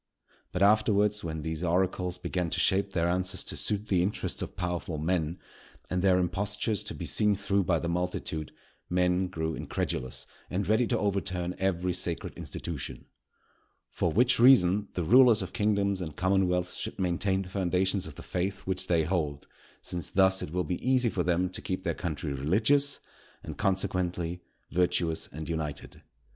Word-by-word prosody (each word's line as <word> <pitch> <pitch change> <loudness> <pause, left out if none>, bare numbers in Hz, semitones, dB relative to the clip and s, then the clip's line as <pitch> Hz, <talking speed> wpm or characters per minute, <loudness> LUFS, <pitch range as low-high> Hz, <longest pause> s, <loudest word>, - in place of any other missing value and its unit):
But, 90 - +1
afterwards, 105 0 +3
when 80 -2 -4
these 80 +1 -3
oracles 90 +1 0
began 90 -1 -2
to - - -2
shape 100 0 +2
their 85 -1 +1
answers 90 +1 0
to - - -5
suit 105 0 0
the 95 -4 +2
interests 95 +4 -2
of - - -5
powerful 90 -2 -3
men, 80 +1 -1 0.5
and 90 0 +1
their 95 -1 +4
impostures 100 +3 -1
to - - -5
be - - -5
seen 105 -1 +2
through 100 -1 0
by 85 -1 +2
the 85 - -3
multitude, 85 -3 -2 0.4
men 90 +1 +2
grew 80 -3 -3
incredulous 65 -4 -3 0.2
and 95 +2 -2
ready 110 +3 +3
to - - +1
overturn 95 -3 -1
every 90 -1 0
sacred 85 -1 -2
institution. 80 -6 -6 0.9
For 85 - 0
which 125 +6 +4
reason, 105 -6 +6
the 90 - -1
rulers 120 +3 +6
of 95 - -8
kingdoms 100 -2 +1
and 80 -4 -5
commonwealths 90 -1 +1
should - - -4
maintain 95 +1 0
the 90 - -11
foundations 95 0 +1
of 80 - -10
the - - -10
faith 95 +2 -2
which 95 -1 -3
they 85 -2 +3
hold; 75 -4 -2 0.4
since 85 -3 -3
thus 95 0 +3
it - - -4
will 90 +3 -1
be 90 +2 -4
easy 130 -2 +3
for 95 - -1
them 90 +1 +1
to - - -5
keep 95 0 -3
their 85 - 0
country 75 -3 -3
religious, 110 - +2 0.4
and, - - -6
consequently, 90 -3 -1 0.3
virtuous 85 -2 +1
and 80 +1 -7
united. 75 -3 -4
90 Hz, 170 wpm, -29 LUFS, 85-100 Hz, 0.9 s, reason